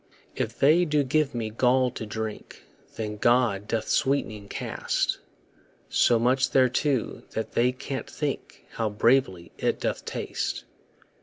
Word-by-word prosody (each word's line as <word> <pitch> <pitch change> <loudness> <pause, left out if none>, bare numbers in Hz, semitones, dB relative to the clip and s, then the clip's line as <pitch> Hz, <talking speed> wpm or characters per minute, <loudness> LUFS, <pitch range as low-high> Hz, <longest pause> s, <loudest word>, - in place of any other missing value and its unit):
If - - -3
they 155 +6 +5
do 150 -3 +2
give 140 0 +1
me 110 -2 -2
gall 125 +2 +3
to 110 - -6
drink, 110 0 -6 0.3
Then 105 -1 -4
God 115 -3 +2
doth 110 -1 -1
sweet'ning 110 -7 0
cast - - -1 0.7
So 120 - +4
much 125 +3 +2
thereto 130 0 +1
that 110 - -3
they 125 +2 +3
can't 135 +1 -6
think 145 -3 -4
How 115 -2 -1
bravely 105 -5 +2
it - - 0
doth - - -2
taste. - - -3
125 Hz, 135 wpm, -26 LUFS, 110-135 Hz, 0.7 s, they